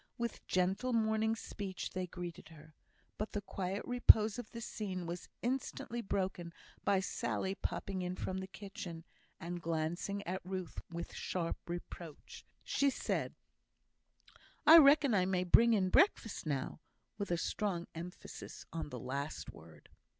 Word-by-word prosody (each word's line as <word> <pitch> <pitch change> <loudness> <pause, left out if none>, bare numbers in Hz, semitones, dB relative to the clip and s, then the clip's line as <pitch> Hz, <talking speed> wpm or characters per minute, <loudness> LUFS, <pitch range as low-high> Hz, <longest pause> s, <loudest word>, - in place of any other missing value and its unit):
With 235 -1 -3
gentle 190 +8 +1
morning 220 0 +2
speech 200 -4 -5
they 185 0 -2
greeted 175 -2 -7
her; 155 -1 -14 0.5
but 215 - -3
the 205 - -1
quiet 195 0 -3
repose 230 -2 +6
of 240 - -7
the 230 - -7
scene 190 -5 -4
was 170 +1 -5
instantly 245 -1 -2
broken 185 -4 -2 0.3
by 195 -2 +3
Sally 190 0 -1
popping 195 -1 -3
in 180 0 -2
from 190 0 -3
the 190 - -5
kitchen, 195 -4 -7 0.3
and 175 +1 -5
glancing 170 +5 -2
at 185 +2 -2
Ruth 185 -2 -4
with 170 0 -5
sharp 170 -1 -3
reproach. 170 -2 -7 0.2
She 280 - +2
said: - - -2 1.3
"I 320 +2 +12
reckon 285 -3 +7
I 185 -3 +3
may 185 -1 +1
bring 230 +6 +6
in 190 -4 +3
breakfast, 225 - +3
now?" 140 0 -2 0.4
with 200 - -2
a 175 - +2
strong 175 0 -1
emphasis 170 +2 -8
on 165 -2 -3
the 125 - -6
last 140 +4 -4
word. - - -15
190 Hz, 145 wpm, -35 LUFS, 175-215 Hz, 1.3 s, I